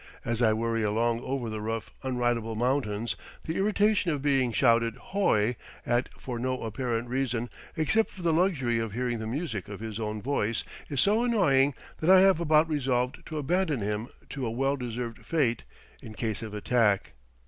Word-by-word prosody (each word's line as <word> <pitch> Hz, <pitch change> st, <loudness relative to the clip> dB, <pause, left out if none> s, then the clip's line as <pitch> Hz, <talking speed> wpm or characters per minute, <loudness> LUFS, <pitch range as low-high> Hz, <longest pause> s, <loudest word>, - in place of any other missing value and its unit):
As 115 Hz, 0 st, -1 dB
I 110 Hz, -2 st, +5 dB
worry 115 Hz, +1 st, 0 dB
along 115 Hz, +2 st, +1 dB
over 130 Hz, -2 st, -3 dB
the 110 Hz, -1 st, -4 dB
rough, 115 Hz, 0 st, -3 dB
unridable 120 Hz, -3 st, -1 dB
mountains, 120 Hz, -2 st, 0 dB, 0.3 s
the 160 Hz, -, -3 dB
irritation 205 Hz, -1 st, +2 dB
of 150 Hz, -3 st, 0 dB
being 135 Hz, -4 st, +2 dB
shouted 115 Hz, -1 st, +3 dB
"hoi!" 125 Hz, -, +1 dB, 0.3 s
at 120 Hz, +1 st, +1 dB
for 125 Hz, -3 st, -5 dB
no 130 Hz, +1 st, -2 dB
apparent 115 Hz, +1 st, -2 dB
reason, 125 Hz, -2 st, -1 dB, 0.3 s
except 205 Hz, +8 st, +2 dB
for 185 Hz, -, -11 dB
the 165 Hz, -1 st, +3 dB
luxury 150 Hz, -10 st, +2 dB
of 115 Hz, -2 st, -3 dB
hearing 120 Hz, 0 st, -1 dB
the 110 Hz, -, -4 dB
music 120 Hz, -, -3 dB
of 100 Hz, -, -7 dB
his 110 Hz, -1 st, -5 dB
own 105 Hz, -1 st, -3 dB
voice, 115 Hz, -3 st, -1 dB, 0.3 s
is 140 Hz, -4 st, -2 dB
so 215 Hz, +4 st, +3 dB
annoying 145 Hz, -, +3 dB, 0.2 s
that 160 Hz, -, 0 dB
I 190 Hz, 0 st, +9 dB
have 190 Hz, -3 st, +5 dB
about 155 Hz, -1 st, +4 dB
resolved 130 Hz, -4 st, -1 dB
to 155 Hz, -, -5 dB
abandon 155 Hz, -, 0 dB
him 105 Hz, +3 st, -2 dB, 0.2 s
to 135 Hz, -2 st, -4 dB
a -, -, -1 dB
well 135 Hz, +4 st, 0 dB
deserved 120 Hz, -2 st, -5 dB
fate, 135 Hz, -8 st, 0 dB, 0.4 s
in 110 Hz, -, -10 dB
case 110 Hz, -3 st, -2 dB
of 110 Hz, -2 st, -6 dB
attack. 105 Hz, -2 st, +2 dB
125 Hz, 180 wpm, -28 LUFS, 115-145 Hz, 0.4 s, I